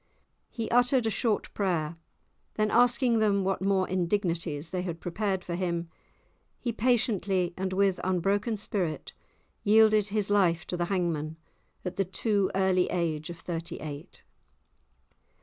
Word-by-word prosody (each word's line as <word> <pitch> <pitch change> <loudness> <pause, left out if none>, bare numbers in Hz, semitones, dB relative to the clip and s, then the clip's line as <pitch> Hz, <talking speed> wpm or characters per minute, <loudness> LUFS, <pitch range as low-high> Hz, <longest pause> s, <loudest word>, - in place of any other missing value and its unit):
He 230 -2 -4
uttered 245 0 +3
a 220 - +1
short 215 +1 -1
prayer; 170 -5 -1 0.6
then 215 0 +1
asking 240 -1 +4
them 200 -2 +2
what 190 0 -1
more 190 -1 +2
indignities 170 -4 -1
they 180 -1 -1
had 170 -2 -4
prepared 190 +1 -2
for 175 - -5
him, 170 -1 -2 0.7
he 240 - -2
patiently 210 -6 +1
and 190 0 -2
with 195 -1 +2
unbroken 195 +5 0
spirit 180 -7 -3 0.5
yielded 215 -1 +5
his 205 -1 -1
life 175 -5 +3
to - - -3
the 175 0 0
hangman, 165 -4 -1 0.5
at 180 - -4
the 195 - +1
too 200 +1 0
early 190 -1 +3
age 160 -3 -2
of 170 - -7
thirty 170 0 -5
eight. 150 +2 -8
190 Hz, 140 wpm, -28 LUFS, 170-210 Hz, 0.7 s, yielded